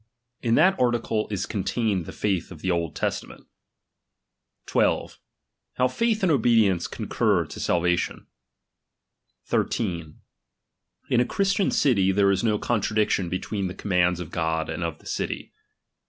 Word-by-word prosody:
In 115 -1 +2
that 190 0 +4
article 120 -3 +1
is 100 -2 -2
contained 100 -3 -1
the - - -6
faith 95 -5 -1
of 85 -5 -11
the 95 - 0
Old 85 -3 -1
Testament. - - -4 1.2
12. - - 0 0.5
How 125 - +2
faith 225 - 0
and 180 - +4
obedience 110 - +3
concur - - 0
to - - -9
salvation. 90 0 0 1.2
13 85 -8 -2 0.9
In 125 - +4
a - - +5
Christian 195 +7 +1
city, 100 -9 +3
there 100 0 +3
is 95 +2 0
no 110 -2 +2
con 115 0 0
tradiction 105 -4 +1
between 95 +2 -2
the 90 - -6
commands 90 -3 +1
of 85 -3 -7
God 80 -1 -1
and 80 +2 -3
of 85 -3 -3
the - - -23
city. - - -4
100 Hz, 140 wpm, -25 LUFS, 90-120 Hz, 1.2 s, a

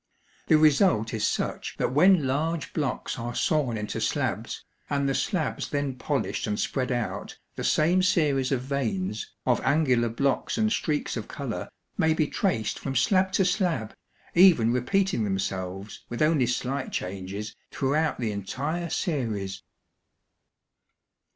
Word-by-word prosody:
The 155 - +6
result 150 - +4
is 110 - +1
such - - -2
that - - 0
when 175 +1 +5
large 155 +5 -1
blocks 145 -4 -2
are 120 +1 -4
sawn 140 -8 +1
into 105 0 -4
slabs, - - -2 0.2
and 140 -1 +1
the 135 - +1
slabs 160 +3 -1
then 145 -2 -1
polished 125 - -2
and 105 -1 -1
spread 130 -1 -1
out, 120 -2 -3 0.2
the - - -4
same 175 +4 +3
series 145 -8 +2
of 130 -3 +1
veins, 110 -7 -2
of - - +2
angular 130 -5 +3
blocks 135 +4 0
and 220 -1 +2
streaks 150 -8 -1
of - - -5
color, - - -5 0.3
may 160 0 +3
be 155 - +2
traced 145 - -1
from 135 - -4
slab 185 - +3
to 190 - +3
slab, 180 - 0 0.4
even 170 -11 +6
repeating 185 - +1
themselves 95 0 -3
with 120 +5 0
only 150 -5 +3
slight 130 +2 -2
changes 95 +3 -5
throughout 150 +3 0
the 115 -3 -1
entire 145 - -3
series. 105 - -2
135 Hz, 140 wpm, -27 LUFS, 115-160 Hz, 0.4 s, The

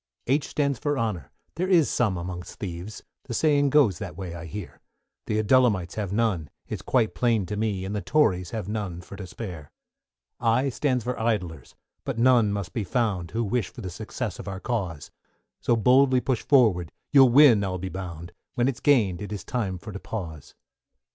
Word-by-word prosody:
=H= 140 +3 +1
stands 140 -4 -1
for 145 -1 -1
Honour, 105 - -2 0.3
there 180 +2 0
is 175 -6 +4
some 105 -7 +1
amongst 90 0 -6
thieves, 90 +2 -6 0.2
The 120 - -4
saying 145 -1 +3
goes 130 - +4
that 90 -5 -7
way 90 -3 -5
I 85 -1 -7
hear; 100 +1 -8 0.5
The 105 - 0
Adullamites 110 -5 +3
have 105 -4 -3
none, 100 -8 0 0.2
it's - - -5
quite 120 -4 +1
plain 115 -5 +1
to 105 - -4
me; 105 -3 -1
And 100 +2 -4
the 105 - -2
Tories 95 - +2
have 110 -5 -4
none 100 -5 -4
for 95 - -11
to 95 -2 -8
spare. 90 -9 -8 0.7
=I= 120 +4 +2
stands 130 -2 0
for 125 +2 -3
Idlers, 90 - -2 0.3
but - - -4
none 120 -3 +4
must 100 -4 -4
be 110 - -1
found, 100 -6 -1
Who 115 +5 -1
wish 110 -1 -1
for - - -11
the 95 -4 -5
success 110 +1 -5
of - - -8
our 95 -1 -4
cause; 95 -11 -3 0.5
So 120 - +2
boldly 130 +3 +4
push 125 -2 -1
forward, 105 - +3 0.2
you'll 135 -3 +7
win 120 -5 +7
I'll 95 -1 -2
be 95 +1 -5
bound, 90 -3 -7 0.2
When 120 -1 +2
it's 130 -2 -2
gained 110 - +3
it 105 -1 -6
is 100 -4 -5
time 100 -7 -2
for 105 +5 -9
to 100 - -6
pause. 85 -11 -7
105 Hz, 195 wpm, -26 LUFS, 90-125 Hz, 0.7 s, you'll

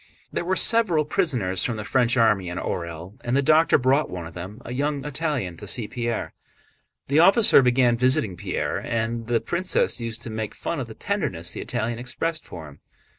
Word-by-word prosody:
There - - -1
were 185 +2 0
several 190 -11 +3
prisoners 125 - 0
from 120 -3 -2
the 105 - -5
French 125 +4 +1
army 105 -6 +3
in 90 - -5
Orël, 85 +6 -5
and 120 +2 0
the 140 - +2
doctor 155 +3 +5
brought 135 +3 +2
one 90 -2 -6
of 80 - -10
them, 95 +6 -8
a 120 - -5
young 145 +1 -2
Italian, 145 - -2
to - - -9
see 115 -4 -1
Pierre. 120 -9 -3 0.7
This 140 +3 +3
officer 200 - +7
began 125 -1 +3
visiting 120 -6 +1
Pierre, - - -3
and 115 0 -3
the 120 -1 +2
princess 175 -6 0
used 115 0 -4
to 115 - -6
make 110 -1 -4
fun 170 - -3
of 125 - -4
the 110 - -10
tenderness 90 - -2
the - - -4
Italian 120 -1 -3
expressed 160 +7 -2
for 80 -3 -9
him. 70 - -15
120 Hz, 195 wpm, -24 LUFS, 105-150 Hz, 0.7 s, officer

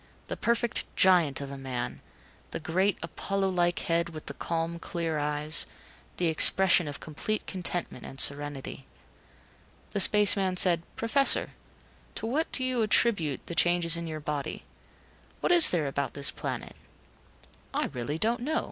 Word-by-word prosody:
The - - -3
perfect 235 0 -1
giant 170 -7 +3
of 140 -1 -7
a 140 - -8
man; 125 -2 -5 0.5
the - - -6
great, 185 +5 0
Apollo 195 +4 -3
like 175 -1 0
head 170 0 -1
with 155 -2 -10
the - - -7
calm, 165 0 -4
clear 165 -3 -4
eyes; 150 +2 0 0.5
the 175 - -1
expression 170 +1 +5
of 145 - -7
complete 190 +8 -4
contentment 180 -7 -4
and 135 - -10
serenity. 140 -2 +1 1.0
The 205 - -3
space 210 +1 +5
man 190 -2 -2
said, 175 -2 +5
"Professor 275 +5 +2 0.6
to - - -4
what 285 +8 -2
do 260 - 0
you 255 -2 -1
attribute 205 - +1
the - - -7
changes 175 -1 +2
in 170 0 -4
your 155 -1 -6
body. 145 -2 -5 0.8
What - - -1
is 345 -2 +10
there 165 -4 -1
about 140 0 -4
this 140 0 +2
planet - - -6 0.5
?" - - -28
"I - - -1
really 125 +4 -4
don't 230 +6 -1
know." 310 +6 -1
170 Hz, 155 wpm, -27 LUFS, 150-195 Hz, 1.0 s, is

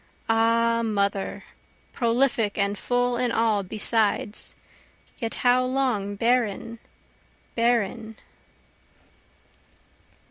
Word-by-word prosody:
Ah 230 +1 +2
Mother, 200 -3 -1 0.5
prolific 235 -3 +1
and 200 0 +1
full 245 +3 0
in 245 -1 0
all 220 -3 +2
besides, 210 +1 -1 0.6
yet 230 -4 -3
how 250 +1 +5
long 255 -6 -1
barren, 230 0 0 0.7
barren?) 230 -1 0
230 Hz, 75 wpm, -25 LUFS, 210-245 Hz, 0.7 s, how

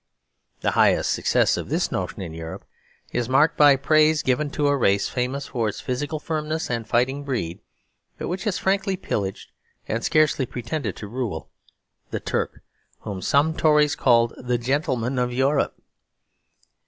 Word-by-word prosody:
The - - +1
highest - - +3
success - - +2
of - - -5
this - - 0
notion - - -3
in 85 -3 -7
Europe 80 0 -7 0.5
is 120 0 -1
marked 145 +4 +4
by 145 -2 +7
praise 155 +2 +3
given 140 +3 +1
to 145 +1 -1
a 145 - +3
race 100 -6 +2
famous 130 +2 -2
for 115 -4 -1
its - - -6
physical 145 +5 -3
firmness 155 0 -3
and 115 -2 -2
fighting 130 +4 +1
breed, 115 -12 -3 0.6
but - - -4
which 185 +2 -4
has 205 -4 0
frankly 195 0 0
pillaged 100 - -4 0.4
and 115 +1 -2
scarcely 150 -4 +2
pretended 125 +6 -4
to 105 - -8
rule; 115 -7 -4 0.6
the - - -3
Turk, - - -3 0.4
whom 95 -3 -5
some 145 - +2
Tories 150 -2 +4
called 120 -5 +3
"the 125 0 -1
gentleman 125 -1 -1
of 125 0 0
Europe." 135 +3 +1
130 Hz, 155 wpm, -24 LUFS, 120-150 Hz, 0.6 s, by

